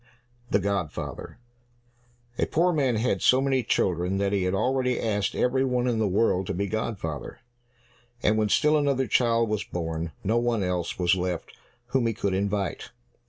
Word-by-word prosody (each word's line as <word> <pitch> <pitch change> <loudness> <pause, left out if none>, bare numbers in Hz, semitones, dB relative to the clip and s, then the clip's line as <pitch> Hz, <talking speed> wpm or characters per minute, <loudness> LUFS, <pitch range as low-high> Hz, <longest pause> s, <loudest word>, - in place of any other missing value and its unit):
42 - - -21
The 100 - -4
Godfather 100 -3 -3 1.0
A - - +2
poor 175 +2 +2
man 135 -6 +1
had 110 -4 0
so 130 - +5
many 135 -1 +1
children 90 -3 0
that 100 0 0
he 95 -2 +1
had 90 +1 0
already 125 +3 +1
asked 105 -3 -1
every 130 +1 +2
one 125 -2 0
in 120 -3 0
the 110 - +2
world 95 -1 +1
to 95 - -2
be 100 +3 -1
godfather, 100 - -4 0.9
and 110 - +3
when 110 -1 +1
still 150 +7 +4
another 140 -2 +1
child 115 -2 +2
was 105 -1 -1
born, 80 -1 -4
no 110 +4 +1
one 120 -3 0
else 90 -2 -2
was 90 -1 +3
left 90 -2 -2 0.4
whom 125 -2 +1
he 115 - -1
could 100 -3 -1
invite. 100 -1 -2
105 Hz, 175 wpm, -26 LUFS, 95-125 Hz, 1.0 s, so